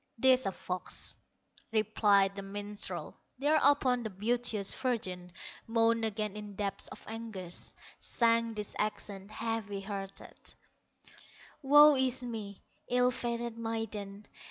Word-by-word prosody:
"'Tis 260 -2 +5
a - - 0
fox", 180 0 -1 0.6
replied 205 -2 +3
the 200 - -5
minstrel. 205 +1 -5 0.2
Thereupon 285 -3 +3
the 220 - -4
beauteous 215 0 +2
virgin 185 -8 -3 0.4
Moaned 230 0 +2
again 210 -1 -2
in 210 -1 -8
depths 200 -1 -3
of - - -11
anguish, 220 -6 -3 0.2
Sang 230 -1 +2
these 210 -1 -4
accents, 205 -1 -3
heavy 215 -3 -3
hearted: 195 -1 -7 1.1
"Woe 295 +1 +8
is 260 -1 +2
me, 215 -5 -6 0.3
ill 250 0 +3
fated 235 -1 -3
maiden! 215 -3 -4
220 Hz, 110 wpm, -31 LUFS, 200-240 Hz, 1.1 s, Woe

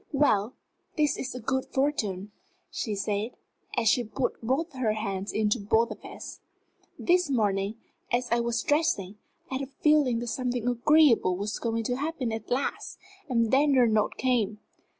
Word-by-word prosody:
"Well, 250 -6 +2 0.4
this 300 -1 +2
is 250 -1 -5
good 265 +1 0
fortune," 215 -9 -1 0.4
she 215 -3 -3
said, 205 +3 -2 0.4
as 235 -2 +2
she 240 +3 +4
put 245 +4 -3
both 280 +8 -1
her 245 -5 0
hands 200 -2 -3
into 215 +2 +1
both 220 +3 +2
of - - -8
his. - - -9 0.6
"This 360 -2 +2
morning, 205 -4 +1 0.4
as 245 +1 +1
I 235 - +3
was 235 0 -1
dressing, 250 - 0 0.3
I 260 - -1
had - - -4
a 275 - -4
feeling 285 -2 +2
that 240 +1 -4
something 245 -1 -2
agreeable 245 - +4
was 205 +2 -3
going 230 -1 -1
to 245 +3 -1
happen 285 -4 -2
at 220 -1 -5
last 255 +3 -2 0.3
and 230 -3 +2
then 280 +1 +4
your 250 -2 +6
note 215 -2 +1
came. 230 -5 +1
240 Hz, 165 wpm, -28 LUFS, 215-270 Hz, 0.6 s, your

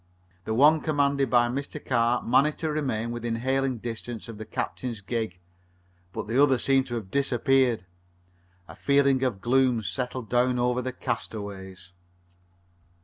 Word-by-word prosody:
The 110 - -1
one 150 +5 +5
commanded 140 -3 +1
by 120 -1 +4
Mr. 140 +4 -4
Carr 120 -2 +1
managed 150 +6 +3
to 160 -1 -2
remain 125 -7 -2
within 120 -1 -3
hailing 130 +2 0
distance 115 0 -6
of 115 -2 -9
the 110 - -6
captain's 120 +1 -4
gig, 110 -2 -3 0.7
but - - -5
the 120 +6 +2
other 135 -3 +5
seemed 135 +1 +2
to 120 - -4
have 105 -5 -6
disappeared. 130 -5 +2 0.8
A - - -11
feeling 140 -2 +3
of 120 -7 -1
gloom 125 -1 +2
settled 125 +3 -4
down 125 +2 +2
over 125 +1 +1
the 130 +1 -3
castaways. 95 -6 -6
125 Hz, 145 wpm, -26 LUFS, 115-135 Hz, 0.8 s, one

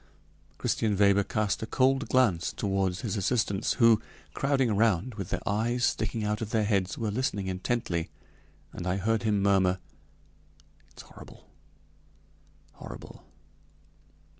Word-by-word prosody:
Christian 105 -3 0
Weber 100 0 +4
cast 105 0 -1
a 110 - -4
cold 135 +3 +2
glance 105 -10 +2
toward 95 -2 0
his 110 +1 -3
assistants, 100 -1 0
who, 115 -3 +5 0.3
crowding 135 -4 +1
around, 110 +1 +1
with 100 -3 -6
their - - -4
eyes 115 +4 +1
sticking 110 0 -1
out 105 +1 -1
of 110 - -3
their 110 -1 +1
heads, 100 -3 0
were 110 -2 -2
listening 105 -4 -1
intently, 95 -2 -2 0.6
and 90 - -5
I 90 +1 0
heard 110 +3 0
him 105 -3 +1
murmur: 95 -2 +3 1.1
"It's - - -13
horrible! - - -15 1.2
horrible!" - - -11
105 Hz, 130 wpm, -28 LUFS, 95-115 Hz, 1.2 s, who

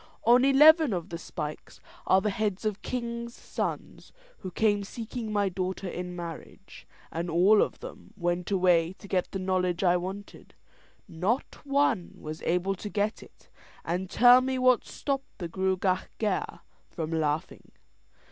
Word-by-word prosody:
On 245 +2 +5
eleven 300 0 +6
of 175 0 -4
the 170 -2 -6
spikes 150 -2 -7 0.3
are 190 - +5
the 210 - 0
heads 205 0 -2
of 210 -2 -2
kings' 235 -1 -4
sons - - -5 0.3
who 185 - -6
came 205 +1 +1
seeking 225 +2 -6
my 205 -1 +1
daughter 185 +1 -3
in 180 0 -5
marriage, 170 -2 -9 0.2
and 170 +2 -3
all 185 +6 +5
of - - -2
them - - -10
went 175 -1 -1
away 180 -3 +3
to 200 - -14
get 185 -2 0
the - - -4
knowledge 185 -1 0
I 180 -1 +4
wanted. 190 +3 -8 0.5
Not 190 +10 -2
one 275 -10 +1
was 155 0 -7
able 180 +3 0
to 205 +2 -7
get 210 +2 -1
it - - -18 0.4
and 180 +2 -2
tell 245 +3 +7
me 260 0 -1
what 255 -1 +3
stopped 275 -1 -4
the 175 - -4
Gruagach 185 +1 0
Gaire 210 -4 -2 0.3
from 160 -1 -5
laughing. 155 -1 -2
190 Hz, 155 wpm, -28 LUFS, 175-230 Hz, 0.5 s, tell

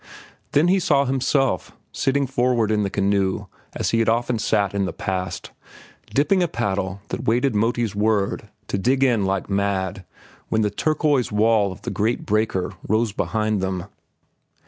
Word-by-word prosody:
Then 150 +4 +4
he 190 +2 +4
saw 140 -5 +2
himself, 135 - 0 0.2
sitting 140 +1 +1
forward 125 -4 +1
in 105 -1 +2
the 100 - 0
canoe 100 -1 0 0.3
as - - -1
he 115 - +2
had 115 - +2
often 120 0 +1
sat 100 -2 +1
in 100 -1 0
the - - -4
past, 95 -2 -4 0.6
dipping 180 +7 +2
a 175 - +2
paddle 100 - -2
that - - -4
waited 120 +3 +2
Moti's 115 +1 0
word 105 0 0 0.2
to 100 - -1
dig 130 +6 +2
in 115 -7 +3
like 95 0 -1
mad 100 -1 -1 0.5
when 110 0 +1
the 105 - 0
turquoise 150 - +1
wall 105 -1 +3
of 95 - -11
the - - -3
great 110 +3 -1
breaker 105 -3 0
rose 110 +1 +1
behind 110 0 -1
them. 95 -1 -2
110 Hz, 165 wpm, -22 LUFS, 100-125 Hz, 0.6 s, Then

